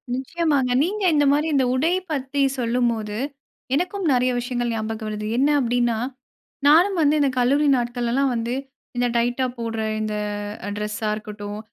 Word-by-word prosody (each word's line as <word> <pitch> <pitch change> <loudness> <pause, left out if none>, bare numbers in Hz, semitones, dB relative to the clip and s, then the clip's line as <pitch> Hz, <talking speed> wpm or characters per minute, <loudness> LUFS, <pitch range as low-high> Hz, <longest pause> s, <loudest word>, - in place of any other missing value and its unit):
நிச்சயமாங்க! 285 -1 0
நீங்க 405 +5 -2
இந்த 290 -1 +4
மாதிரி 295 +2 +2
இந்த 270 -2 +3
உடை 290 +6 +2 0.2
பத்தி 280 -1 -1 0.2
சொல்லும்போது, 230 -3 0 0.6
எனக்கும் 365 +6 -1
நெறைய 250 0 +3
விஷயங்கள் 245 -1 -2
ஞாபகம் 220 0 -3
வருது. 210 0 -4
என்ன 280 +3 +3
அப்படின்னா 240 -2 +1 0.7
நானும் 350 +6 +5
வந்து 300 -1 +4
இந்த 280 -2 +3
கல்லூரி 275 +4 +3
நாட்களெல்லாம் 245 +2 0
வந்து, 235 +1 -2 0.4
இந்த 245 0 +2
டைட்டா 245 +2 +1
போடுற 225 -1 -3 0.2
இந்த 215 0 -2 0.5
அ - - -3
டிரஸ்ஸா 210 +1 -3
இருக்கட்டும், 210 -1 -7
245 Hz, 145 wpm, -23 LUFS, 230-285 Hz, 0.7 s, நானும்